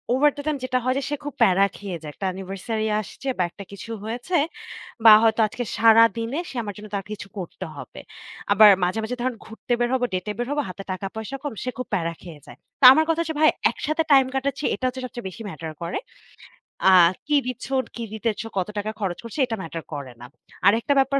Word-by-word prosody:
Over 295 +3 +5
the - - -4
time 300 -2 0
যেটা 255 0 0
হয় 255 +1 +1
যে - - -5
সে 295 - -1
খুব 290 -1 -5
প্যারা 195 +1 +5
খেয়ে 195 -4 -5
যায়। 150 -2 -7
একটা 195 - -6
Anniversary 195 +4 -4
আসছে 245 +6 -10
বা 185 - +2
একটা 200 - -11
কিছু 200 +3 -9
হয়েছে 240 +11 -3 0.7
বা 220 - +11
হয়তো 225 0 +3
আজকে 245 +3 -5
সারাদিনে 230 - +4
সে - - -11
আমার 205 -2 -5
জন্য 210 +1 -9
তার 195 -1 -3
কিছু 205 -1 -6
করতে 185 +1 -7
হবে। - - -9 0.5
আবার 210 +1 +8
মাঝে, 180 +5 0
মাঝে 245 +3 -3
ধরুন 255 0 -1
ঘুরতে 225 +2 -10
বের 240 0 +1
হবো, 255 -1 +2
ডেটে 185 +3 -2
বের 240 0 -2
হবো, 295 0 +1
হাতে 190 +2 -8
টাকা 185 +1 -4
পয়সা 220 +5 -5
কম, 290 - -3
সে 255 - -2
খুব 255 - -4
প্যারা 170 -3 0
খেয়ে 165 -4 -11
যায়। 120 - -13 0.2
তা - - +7
আমার 315 +3 +3
কথা 325 0 +1
হচ্ছে 320 -1 -3
ভাই, 310 - +7 0.2
একসাথে 310 +2 -1
টাইম 270 -2 +7
কাটাচ্ছি 275 +1 -2
এটা 255 - -4
হচ্ছে 255 +1 -4
সবচেয়ে 240 -4 -7
বেশি 185 - -11
ম্যাটার 160 -2 -7
করে। 170 +1 -3 0.9
আ - - +8 0.4
কি 295 0 +2
দিচ্ছেন, 260 +2 -2
কী 235 - -4
দিতেছ, 220 0 -2 0.2
কত 185 - -1
টাকা 210 +1 -2
খরচ 185 -4 -2
করছো 230 +5 -8
এটা 225 - -3
ম্যাটার 165 0 -6
করে 140 -4 -6
না। 120 - -9 0.4
আরেকটা 225 +7 +4
ব্যাপার 275 +1 +3
225 Hz, 220 wpm, -23 LUFS, 195-260 Hz, 0.9 s, বা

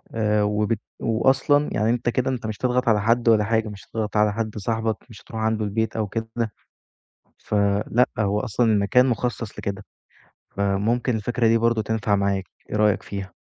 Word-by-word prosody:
آآ، 105 -1 +2
وبالت 105 +1 0 0.2
وأصلًا 135 +6 +2
يعني 110 +1 +1
أنت 120 0 +1
كده 130 +2 0
أنت 120 -3 -4
مش 110 - -4
هتضغط 125 0 0
على 105 -2 +4
حد 115 +2 +2
ولا 110 -2 +5
حاجة 110 0 0
مش 100 -2 -10
هتضغط 110 -1 -3
على 105 -1 +3
حد 110 -1 -3
صاحبك 110 +1 -1
مش 110 - -13
هتروح 110 -1 -7
عنده 110 -1 0
البيت 110 +2 -1
أو 110 -2 -1
كده، 110 +2 -4 1.1
فلأ 105 +4 +1
هو 105 0 +1
أصلًا 115 +3 0
المكان 105 +5 +4
مُخصص 120 -2 -2
لكده، 100 0 -4 0.7
فممكن 110 +5 +1
الفكرة 120 +2 0
دي 115 0 +4
برضه 115 -1 +2
تنفع 105 -2 0
معاك، 100 -1 0 0.3
إيه - - -2
رأيك 105 -1 +2
فيها؟ 100 -1 -6
110 Hz, 175 wpm, -23 LUFS, 105-115 Hz, 1.1 s, ولا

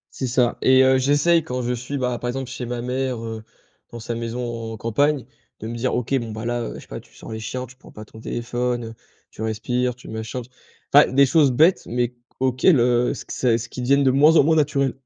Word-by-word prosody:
C'est 130 - -2
ça 120 -1 +1
et 130 0 +5
heu, 130 0 +4
j'essaie 145 +5 +3
quand 125 -4 -3
je 120 +1 -1
suis, 125 +4 -4
bah, 125 -2 -1
par 120 - -6
exemple, 130 +1 -4
chez 125 -1 -5
ma 120 0 -4
mère, 125 -1 -2
heu, 110 -1 -6 0.5
dans 120 - -7
sa 115 +1 -4
maison 115 -1 -4
en - - -6
campagne, 135 +6 0 0.4
de 110 - -6
me 120 - -5
dire: 125 +2 -1
«OK. 125 +3 0
Bon, 115 -3 -6
bah, 110 +1 -6
là, 120 0 -1
heu, 115 - -5
je - - -8
sais - - -15
pas, - - -6
tu - - -18
sors - - -11
les 110 - -4
chiens. 125 +3 -5
Tu 130 +2 -17
prends 130 - -17
pas 110 - -10
ton 110 +1 -14
téléphone, 120 +1 -2
heu, 115 - -9 0.4
tu - - -14
respires, 120 +3 -1
tu 125 - -14
machin». 110 +3 -5 0.5
Enfin, - - +8
des 140 +1 +5
choses 145 -1 +4
bêtes, 160 +9 +4
mais 120 0 -1 0.3
auxquelles, 130 +4 +3
heu, 120 0 +2
s - - -4
q - - -8
c'est 120 -3 +2
ce 115 0 -7
qui 125 - -7
deviennent 140 +3 +3
de 135 - +4
moins 145 +5 +5
en - - +7
moins 160 +3 +3
naturelles. 140 -3 +1
125 Hz, 250 wpm, -22 LUFS, 115-130 Hz, 0.5 s, Enfin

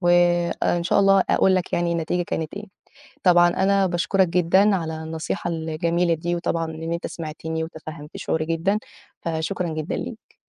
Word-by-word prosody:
وإن 175 -1 +2
شاء 175 - +3
الله 195 -1 +5
أقول 190 - +4
لك 185 -1 -1
يعني 170 0 +1
النتيجة 170 +1 -1
كانت 160 -2 -4
إيه. 205 +1 -6 0.6
طبعًا 175 -1 +6
أنا 195 +2 +2
باشكرك 185 +2 +2
جدًا 180 +4 +3
على 160 -3 -4
النصيحة 160 +2 -3
الجميلة 165 +1 0
دي 175 +2 -2
وطبعًا 165 -1 -1
إن 160 +1 -4
أنت 170 - -3
سمعتني 160 0 -5
وتفهَّمت 155 -2 -9
شعوري 160 -1 -1
جدًا، 165 +6 0 0.4
فشكرًا 165 +2 -2
جدًا 155 -1 -3
ليك. - - -7
170 Hz, 155 wpm, -23 LUFS, 160-180 Hz, 0.6 s, طبعًا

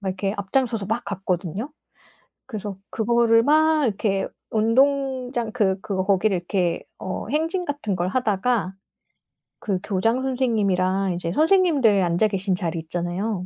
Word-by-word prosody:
막 195 - -3
이렇게 195 +2 -2
앞장서서 215 0 -1
막 225 +2 -2
갔거든요. 195 - -3 0.8
그래서 210 -5 -6
그거를 230 0 +3
막 310 0 +4
이렇게 195 -2 0 0.2
운동장 255 +1 +1
그 200 -5 +1
그거 190 -2 -2
거기를 195 0 +2
이렇게 175 -1 -1 0.2
어 185 - -5
행진 330 +5 -1
같은 285 -9 -2
걸 175 0 -1
하다가 215 -2 0 0.9
그 195 -4 -2
교장 225 +5 0
선생님이랑 200 -8 +1
이제 170 -1 -3
선생님들 305 - +4
앉아 175 +5 +2
계신 195 -2 -1
자리 170 -3 -3
있잖아요? 180 +4 -3
210 Hz, 305 characters per minute, -23 LUFS, 190-250 Hz, 0.9 s, 막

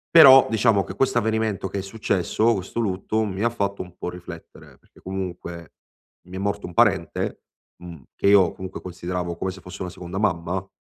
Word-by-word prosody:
Però, 135 -5 +10
diciamo 110 -2 +3
che 95 - -8
questo 120 +3 +1
avvenimento 110 -3 -1
che 100 - -4
è - - -1
successo, 105 +2 0
questo 95 +3 -3
lutto, 105 +1 -1
mi 100 -1 -3
ha 115 - +3
fatto 100 -3 -2
un 90 -1 -10
po' - - -4
riflettere, 90 -1 -11
perché - - -24
comunque 90 -3 -6 0.6
mi 90 - -10
è - - -4
morto 100 +1 -2
un 85 - -10
parente, 95 -7 +1 0.3
mhmm, 85 -6 -11
che - - +1
io 100 -4 +6
comunque 95 0 -8
consideravo 90 -1 -4
come 95 - -2
se 95 0 -12
fosse 90 +2 -10
una 90 - -4
seconda 90 +2 -7
mamma, 90 -1 -1
95 Hz, 190 wpm, -23 LUFS, 90-105 Hz, 0.6 s, Però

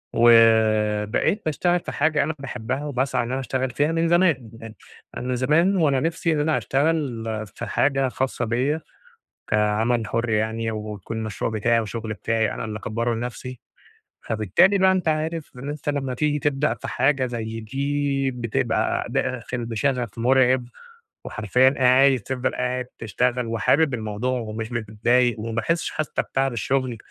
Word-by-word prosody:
وبقيت 110 - +4
باشتغل 175 +3 +1
في - - -7
حاجة 155 0 +2
أنا 160 - -2
باحبها 130 +1 -4
وباسعى 135 -2 0
إن 120 - -5
أنا 135 - -1
أشتغل 130 0 -2
فيها 145 +5 +1
من 165 0 +1
زمان، 165 - +2 0.7
أنا 125 +1 -2
زمان 155 +10 +3
وأنا 145 -6 +3
نفسي 165 +2 -1
إن 150 - 0
أنا 155 +1 +1
أشتغل 140 -5 0 0.3
في - - -5
حاجة 135 -1 +1
خاصة 130 -1 -2
بيَّ 130 +7 0 0.7
كعمل 105 +2 +1
حر 115 +2 -1
يعني 110 +1 0
ويكون 105 0 -6
المشروع 110 0 -3
بتاعي 115 +2 +2
وشغل 110 0 -4
بتاعي 110 +1 0
أنا 115 - -5
اللي 110 0 -5
أكبَره 115 +2 -2
لنفسي. 125 +1 -6 0.7
فبالتالي 110 - +3
بقى 190 0 +5
أنت 185 -3 0
عارف 155 0 -2
إن 135 +3 -7
أنت 150 0 -5
لمّا 135 -3 -1
تيجي 150 +3 0
تبدأ 145 +1 0
في - - -8
حاجة 135 -2 +1
زي 115 -2 -5
دي 140 +3 -1
بتبقى 115 - -1
داخل 125 -1 -2
بشغف 120 0 -2
مرعب، 130 +1 +3 0.6
وحرفيًا 125 +5 +3
قا 130 - 0
عادي 130 0 +5
تفضل 130 +4 -3
قاعد 125 0 -2
تشتغل 125 +2 0
وحابب 135 +6 +2
الموضوع 115 +3 -2
ومش 110 0 -5
متضايق 115 +2 +1
وما 115 +1 -4
باحسش 160 +9 -1
حتى 155 -1 -2
بتعب 135 -1 -1
الشغل، 130 +1 -1
125 Hz, 150 wpm, -23 LUFS, 115-140 Hz, 0.7 s, بقى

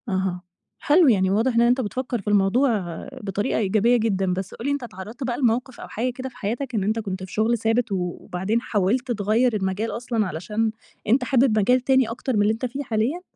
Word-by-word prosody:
أها، 190 -2 -1 0.4
حلو 320 +2 +4
يعني 190 -6 +4
واضح 225 +5 +1
إن 235 - +5
أنت 245 +2 +3
بتفكر 245 +1 -3
في - - -18
الموضوع 205 +7 +3 0.5
بطريقة 205 0 -1
إيجابية 220 +4 +3
جدًا، 195 -5 0
بس 190 +1 -4
قُل 230 - -8
لي 285 - +1
أنت 285 -2 -2
اتعرضت 220 +3 -8
بقى 245 -2 -2
لموقف 250 0 0
أو - - -8
حاجة 245 +4 -2
كده 260 +1 -6
في 250 - -19
حياتك 240 +5 -3
إن 205 - +1
أنت 215 +3 0
كنت 190 -3 -4
في 185 - -9
شغل 225 +2 +2
ثابت، 225 +1 0
وبعدين 185 +3 -2
حاولت 235 +6 0
تغيّر 220 +2 +2
المجال 200 +3 -1
أصلًا 230 -3 -1
علشان، 210 +7 -2 0.4
أنت 250 +5 +3
حابب 250 -4 +3
مجال 250 +5 +4
تاني 260 -2 +3
أكتر 245 +2 -3
من 205 - +3
اللي 210 +1 +3
أنت 225 +3 -4
فيه 270 +4 -4
حاليًا؟ 240 +8 -1
225 Hz, 205 wpm, -23 LUFS, 200-250 Hz, 0.5 s, إن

